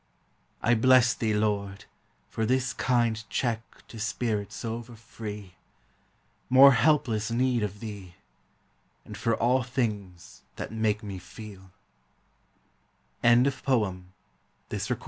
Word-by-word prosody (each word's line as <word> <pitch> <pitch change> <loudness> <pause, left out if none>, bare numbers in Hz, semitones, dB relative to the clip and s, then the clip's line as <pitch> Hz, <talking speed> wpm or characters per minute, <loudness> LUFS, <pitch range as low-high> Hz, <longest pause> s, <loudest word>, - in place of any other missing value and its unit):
I 115 - +4
bless 125 +1 +5
thee. 110 -2 -1
Lord, 100 -2 -1 0.4
for 110 - -3
this 125 +3 +1
kind 120 -3 +1
check 115 -3 -3
To 115 - -10
spirits 110 -1 -3
over 115 +1 -5
free! 105 -4 -9 1.0
More 135 +2 +9
helpless 125 -6 +2
need 125 0 +1
of 105 -1 -4
thee! 100 -6 -8 0.9
And - - -9
for 115 -1 0
all 125 +3 +2
things 105 -8 -4
that - - -6
make 110 -1 0
me 100 -3 -6
feel 95 +1 -12 1.5
FREDERICK 125 +4 +3
WILLIAM 100 -8 0 0.6
FABER. - - -2
110 Hz, 110 wpm, -27 LUFS, 105-120 Hz, 1.5 s, More